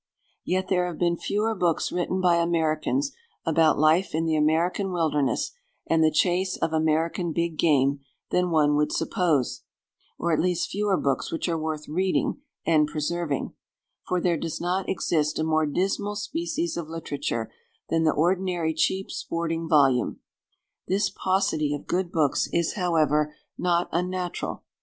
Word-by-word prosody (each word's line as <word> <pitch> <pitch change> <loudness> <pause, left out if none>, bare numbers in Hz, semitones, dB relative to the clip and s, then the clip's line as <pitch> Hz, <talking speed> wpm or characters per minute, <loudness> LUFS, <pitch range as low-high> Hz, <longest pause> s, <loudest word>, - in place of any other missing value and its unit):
Yet 185 +1 -1
there 180 -1 +1
have 170 -3 -6
been 170 -1 +2
fewer 210 +5 -1
books 175 -5 0
written 180 +1 -1
by 175 -2 +4
Americans 170 - +1 0.3
about 160 -1 +3
life 155 +4 +3
in 165 +1 0
the 160 -1 +1
American 165 +6 +1
wilderness 155 -5 0 0.3
and 165 -1 +3
the 155 - +5
chase 180 +4 +1
of 160 - -1
American 160 +2 +1
big 170 0 -1
game 140 -3 +3 0.3
than 180 0 +2
one 150 -3 +3
would 150 0 +1
suppose, 165 - 0 0.6
or 170 - -1
at 155 - +2
least 180 -1 0
fewer 205 -1 +1
books 135 -1 -1
which 165 - -2
are 170 - 0
worth 155 -1 -4
reading 185 - 0 0.2
and 155 -2 +4
preserving; 150 0 -2 0.5
for 180 - +1
there 175 -1 +1
does 165 0 -4
not 180 +2 -1
exist 155 -4 0
a 155 - 0
more 155 -1 +2
dismal 195 +6 -1
species 330 - -2
of 165 -2 -5
literature 145 -8 -3 0.4
than 165 0 +2
the 155 - +4
ordinary 175 0 +1
cheap 190 +4 0
sporting 165 -1 -3
volume. 135 -6 +3 0.7
This 195 +3 +1
paucity 160 -6 0
of 145 - -8
good 180 -1 -1
books 155 -5 +1
is, 170 -1 +1
however, 150 -5 +1 0.2
not 175 -1 +1
unnatural. 180 +1 -3
170 Hz, 150 wpm, -26 LUFS, 155-180 Hz, 0.7 s, the